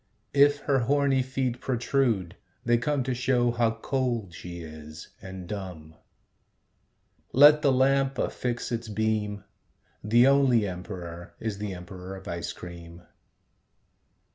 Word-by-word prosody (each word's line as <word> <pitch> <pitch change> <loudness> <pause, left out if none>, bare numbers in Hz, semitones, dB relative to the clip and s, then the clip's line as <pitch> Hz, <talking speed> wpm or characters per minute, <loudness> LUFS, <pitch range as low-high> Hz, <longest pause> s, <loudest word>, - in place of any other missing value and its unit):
If 145 +1 +5
her 135 -2 +2
horny 135 +2 +2
feet 130 -1 -2
protrude, 120 -7 0 0.3
they 120 0 +3
come 140 +2 0
To 130 0 -1
show 125 -1 +2
how 120 -1 +2
cold 120 -6 -2
she 85 0 -8
is, 80 -1 -10
and 95 -1 -8
dumb. 90 -6 -7 1.4
Let 145 +4 +8
the 140 - +4
lamp 135 +1 +2
affix 120 -1 -2
its 115 -1 -3
beam. 105 -1 -1 0.6
The 120 +4 +5
only 135 -6 +4
emperor 90 -2 -7
is 110 -3 -4
the 105 -3 -4
emperor 90 +1 -8
of 95 0 -11
ice 85 -1 -4
cream. 85 -1 -10
115 Hz, 125 wpm, -27 LUFS, 90-130 Hz, 1.4 s, Let